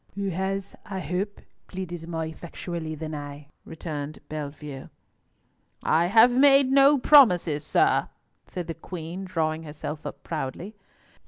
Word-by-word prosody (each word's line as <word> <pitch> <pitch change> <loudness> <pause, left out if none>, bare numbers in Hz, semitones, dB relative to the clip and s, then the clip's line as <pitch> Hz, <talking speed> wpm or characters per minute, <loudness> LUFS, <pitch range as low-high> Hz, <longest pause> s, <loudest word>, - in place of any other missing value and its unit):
"Who 200 0 -2
has, 190 +2 -3
I 195 -2 -5
hope, 185 +5 -3 0.3
pleaded 175 -3 -6
more 165 -1 -3
effectually 160 0 -6
than 155 0 -6
I," 145 -1 -8 0.2
returned 155 -2 -6
Bellievre. 145 -2 -7 0.9
"I 165 +2 +3
have 225 +6 +6
made 275 0 +6
no 275 +1 +6
promises, 180 - +5
sir," - - +2 0.4
said 180 -2 -5
the 165 - -4
Queen, 170 +2 -7
drawing 160 -3 -1
herself 150 0 -7
up - - -9
proudly. 165 +6 -5
170 Hz, 130 wpm, -26 LUFS, 155-195 Hz, 0.9 s, have